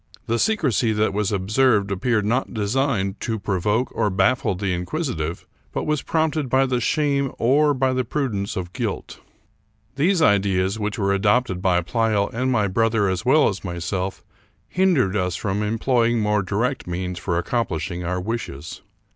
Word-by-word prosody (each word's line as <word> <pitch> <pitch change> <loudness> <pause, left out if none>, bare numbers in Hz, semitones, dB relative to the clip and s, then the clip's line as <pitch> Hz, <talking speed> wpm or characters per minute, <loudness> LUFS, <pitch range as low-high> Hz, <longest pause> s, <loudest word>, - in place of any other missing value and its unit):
The 115 +1 0
secrecy 130 - +1
that 105 -1 +1
was 105 0 0
observed 105 +1 +2
appeared 105 +2 0
not 120 +3 -1
designed 105 -2 0
to 115 -1 -2
provoke 105 +5 0
or 110 -2 +1
haffie 100 +1 +1
the 95 -1 -1
inquisitive, 90 - -3 0.3
but - - -2
was 150 -2 0
prompted 155 -4 0
by 135 +1 +3
the 125 -2 -1
shame 140 +1 +1
or 145 +4 +3
by 130 0 +1
the 130 0 0
prudence 115 -6 -2
of 90 -1 -5
guilt. 115 -6 -4 0.8
These 175 +6 +3
ideas, 100 - +2
which 105 -1 -2
were 100 -1 +1
adopted 100 -1 +1
by 90 -2 +2
Pleyel 110 +1 0
and 130 +3 0
my 105 -5 +2
brother 110 0 +1
as 95 -1 -2
well 150 +4 +5
as 100 - -3
myself, 90 +1 -3 0.4
hindered 170 - +2
us 90 -3 0
from 100 +1 -2
employing 115 +2 +1
more 105 -1 +1
direct 110 +7 -2
means 90 0 -3
for 85 -1 -1
accomplishing 90 -3 -2
our 90 +2 -2
wishes. 95 -8 -5
105 Hz, 160 wpm, -22 LUFS, 95-130 Hz, 0.8 s, well